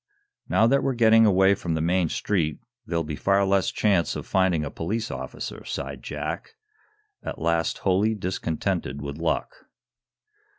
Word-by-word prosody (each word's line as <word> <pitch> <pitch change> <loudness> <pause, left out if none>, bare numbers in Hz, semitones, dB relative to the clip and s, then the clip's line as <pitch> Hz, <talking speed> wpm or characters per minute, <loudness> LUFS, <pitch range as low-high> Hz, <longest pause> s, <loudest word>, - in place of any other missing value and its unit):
"Now, 110 - +4
that 135 +4 +3
we're 135 -2 0
getting 115 -1 +6
away 95 0 +5
from 85 -4 -2
the - - -1
main 85 +1 +1
street 80 -7 -1 0.3
there'll 85 0 0
be 75 -1 -4
far 100 +5 +2
less 95 -1 +2
chance 95 -7 +1
of - - -5
finding 95 -5 +1
a 70 - -5
police 110 +7 -3
officer," - - -6
sighed - - -5
Jack, - - -5 0.7
at - - -6
last 85 0 0
wholly 100 +4 +2
discontented 85 -6 -2
with 70 +2 -6
luck. 85 - -1
95 Hz, 155 wpm, -25 LUFS, 80-105 Hz, 0.7 s, getting